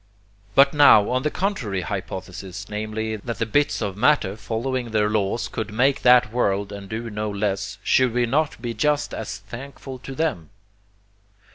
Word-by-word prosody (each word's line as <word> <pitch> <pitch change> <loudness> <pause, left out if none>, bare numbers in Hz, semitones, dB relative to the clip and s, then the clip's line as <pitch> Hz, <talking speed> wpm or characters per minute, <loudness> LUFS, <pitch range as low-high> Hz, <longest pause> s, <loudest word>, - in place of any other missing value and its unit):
But 140 0 +6
now, 140 -8 +6
on 130 0 +1
the 150 - 0
contrary 145 - -2
hypothesis, 95 +1 -6
namely, 110 +1 -3
that 115 +1 -5
the 115 - 0
bits 145 +2 +1
of 100 -2 -3
matter 105 -3 +2
following 120 +3 -3
their 105 -1 +1
laws 105 +2 0
could 110 -2 -5
make 135 +5 +2
that 125 -3 +5
world 100 -4 0
and 100 -1 -8
do 115 +1 -4
no 105 0 -3
less, 100 -1 -2
should 130 -2 +3
we 120 +1 +1
not 145 +4 0
be 120 0 -4
just 150 +3 0
as 110 -2 -5
thankful 130 +5 -9
to 135 +1 -8
them? 145 - -2
110 Hz, 165 wpm, -23 LUFS, 100-130 Hz, -, But